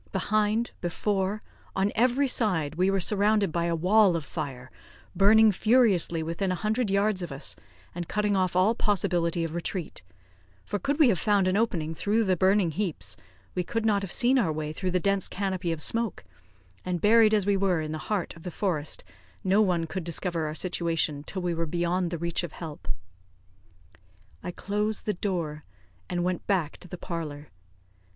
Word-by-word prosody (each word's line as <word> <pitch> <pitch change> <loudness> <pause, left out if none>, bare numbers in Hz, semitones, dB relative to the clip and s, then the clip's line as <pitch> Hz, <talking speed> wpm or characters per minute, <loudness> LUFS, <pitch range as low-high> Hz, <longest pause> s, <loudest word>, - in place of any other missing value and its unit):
Behind, 215 +4 0
before, 195 +3 -1 0.3
on 195 +2 +1
every 250 +5 +2
side, 180 - +1
we 180 +4 +2
were 195 0 +1
surrounded 205 0 +2
by 170 +1 0
a 170 -1 0
wall 190 +2 +4
of 160 -3 -3
fire, 135 -6 -6 0.4
burning 215 +2 +6
furiously 200 -7 +3
within 170 +4 -2
a - - 0
hundred 215 +4 -1
yards 200 0 +1
of 175 - -5
us, 135 +2 -2 0.4
and 175 -1 -5
cutting 210 -1 0
off 185 -2 +1
all 185 +5 +4
possibility 175 -6 0
of 165 -1 -4
retreat; 175 0 -4 0.6
for 205 - -3
could 285 +4 -1
we 300 -6 +6
have 185 -7 +1
found 205 -3 +2
an 185 - +1
opening 175 -8 0
through 210 +7 +1
the 190 -3 +2
burning 190 0 +3
heaps, 150 - -3 0.4
we 180 - -1
could 225 +5 -2
not 205 -2 +3
have 195 -3 -5
seen 255 +2 +3
our 175 -9 +1
way 155 0 -4
through 185 +3 -2
the 180 0 +1
dense 195 +1 +1
canopy 185 -3 -2
of 165 - -3
smoke; 230 - -2 0.6
and, 180 -1 -2
buried 220 +3 +5
as 210 -3 +2
we 200 0 +3
were 190 -3 +1
in 155 -1 -4
the 155 - -4
heart 205 -5 -1
of 165 - -13
the 180 - -5
forest, 170 -5 -2 0.4
no 195 +3 +3
one 180 -5 +1
could 185 +2 -5
discover 170 -1 -2
our 150 - -5
situation 165 -4 -1
till 185 +3 -4
we 175 -1 0
were 165 0 -2
beyond 175 +2 0
the 170 - -3
reach 170 +1 -1
of 175 -4 -6
help. 150 - -8 1.5
I - - -5
closed 210 +4 -2
the 210 - 0
door, 170 -6 -3 0.5
and 175 -1 -1
went 180 -1 -2
back 180 -7 0
to - - -12
the 180 - -7
parlour. 155 -4 -6
185 Hz, 185 wpm, -27 LUFS, 165-210 Hz, 1.5 s, burning